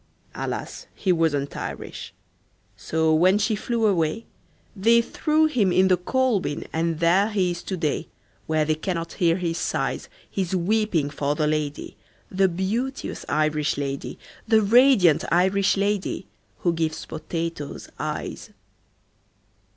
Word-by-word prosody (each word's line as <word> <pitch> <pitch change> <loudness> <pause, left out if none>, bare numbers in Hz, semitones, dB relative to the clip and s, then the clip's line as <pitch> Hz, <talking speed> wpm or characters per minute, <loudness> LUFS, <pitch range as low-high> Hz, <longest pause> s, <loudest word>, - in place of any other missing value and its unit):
Alas, - - -5
he 190 - 0
wasn't 155 -5 0
Irish. - - -6 0.6
So 160 0 0
when 185 +5 +4
she 215 +1 +1
flew 230 +2 -1
away, 180 +1 +1 0.5
They 230 +4 +4
threw 305 +6 +1
him 235 -12 +2
in 190 +1 +4
the 185 - +4
coal 255 +4 +1
bin 145 -5 -4
And 165 0 -1
there 180 +5 +3
he 190 -4 +1
is 175 0 -5
to 190 - -4
day, 155 -1 -1 0.4
Where 155 -1 +1
they 155 - +2
cannot 165 +1 -3
hear 170 0 +4
his 170 -2 -2
sighs - - -2 0.2
His 190 -1 -2
weeping 180 -5 +1
for 145 0 -1
the 155 - 0
lady, 150 -1 -2 0.3
The 190 +1 +3
beauteous 210 +10 -3
Irish 155 -1 +1
lady, 140 -1 -4 0.3
The 220 -1 +4
radiant 220 - +5
Irish 190 +3 +3
lady 200 -1 -1 0.4
Who 175 - +2
gives 160 -1 -2
potatoes 165 -2 -5
eyes." - - -4
180 Hz, 135 wpm, -24 LUFS, 160-205 Hz, 0.6 s, radiant